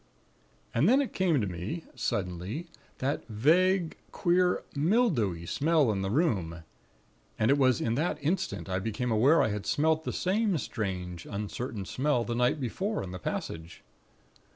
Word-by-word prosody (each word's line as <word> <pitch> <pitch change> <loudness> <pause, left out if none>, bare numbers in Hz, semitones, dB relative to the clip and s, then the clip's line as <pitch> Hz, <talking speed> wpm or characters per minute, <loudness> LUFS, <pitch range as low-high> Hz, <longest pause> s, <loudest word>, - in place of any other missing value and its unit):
"And 145 - +3
then 260 +3 +5
it 280 - -1
came 175 -6 +2
to - - 0
me, 95 - -4
suddenly, 95 - -3 0.3
that 135 +3 -2
vague, 165 - +2
queer, 180 0 +2
mildewy 145 - +1
smell 145 - +2
in 100 -2 -1
the 95 - -1
room; 95 - 0 0.7
and 110 +4 +3
it 140 - +4
was 130 -3 +4
in 115 - 0
that 150 +4 0
instant 120 - -1
I 95 0 -1
became 115 +4 -2
aware 130 +9 +5
I - - +1
had 105 -1 -4
smelt 160 +1 +2
the - - -2
same 200 0 +1
strange, 90 - -4
uncertain 105 +1 -4
smell 130 +2 0
the 120 - -3
night 125 +5 +2
before 190 - -2
in 90 - -7
the 90 - -6
passage. 80 0 -5
125 Hz, 155 wpm, -29 LUFS, 100-165 Hz, 0.7 s, then